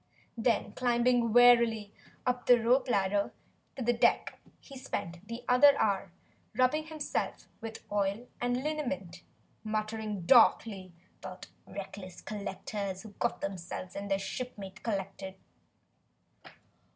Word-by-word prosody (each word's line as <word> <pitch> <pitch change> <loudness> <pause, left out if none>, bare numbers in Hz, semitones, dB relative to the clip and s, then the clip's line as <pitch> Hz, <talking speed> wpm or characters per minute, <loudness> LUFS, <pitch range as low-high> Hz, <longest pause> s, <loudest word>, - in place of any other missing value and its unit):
Then 230 -1 +1
climbing 240 -1 +2
wearily 235 -3 +5 0.3
up 250 -1 -1
the 245 -1 +7
rope 250 +3 +3
ladder 200 -1 +1 0.4
to 260 - -4
the 240 +1 +3
deck, 235 - +2 0.2
he 275 - -13
spent 175 -9 -5 0.3
another 280 +3 +7
hour 195 -3 0 0.4
rubbing 305 +5 +2
himself 310 -2 -3
with 225 -1 -7
oil 205 +3 0
and 245 +1 0
liniment, 195 - -3 0.4
muttering 215 -2 -3
darkly 200 -4 +4 0.3
about 185 +1 -9 0.2
reckless 190 -2 -8
collectors 200 -1 -5
who 220 - -9
got 240 - -1
themselves 185 -1 -5
and 200 +1 -5
their 195 - +2
shipmates 195 -2 -6
collected. 195 -3 -4
215 Hz, 115 wpm, -31 LUFS, 195-245 Hz, 0.4 s, the